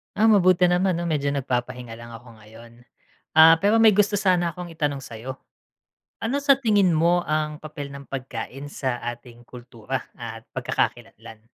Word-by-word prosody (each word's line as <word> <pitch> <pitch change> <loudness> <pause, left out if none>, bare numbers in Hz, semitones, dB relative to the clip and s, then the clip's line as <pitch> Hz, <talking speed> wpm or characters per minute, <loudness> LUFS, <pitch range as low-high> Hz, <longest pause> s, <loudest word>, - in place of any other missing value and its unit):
Ah, 220 +2 +4
mabuti 185 -3 +4
naman 180 +1 +2
'no, 170 - -3
medyo 145 -3 -1
nagpapahinga 125 -3 -3
lang 115 0 -11
ako 115 -1 -15
ngayon. 110 +2 -15 0.7
Ah, 160 +1 +9
pero 210 +3 +4
may 220 -2 +6
gusto 205 0 +2
sana 180 -3 +2
akong 175 0 -9
itanong 150 -3 -2
sa'yo. 125 +4 -8 0.9
Ano 250 +6 0
sa 280 -1 +4
tingin 205 -9 +2
mo 170 +3 +3
ang 155 0 -1
papel 150 -2 -8
ng 140 0 -10
pagkain 135 +2 -7
sa 130 -4 -2 0.2
ating 120 0 -14
kultura 120 +1 -6 0.2
at 115 -1 -9
pagkakakilanlan? 110 -1 -4
145 Hz, 155 wpm, -23 LUFS, 120-180 Hz, 0.9 s, Ah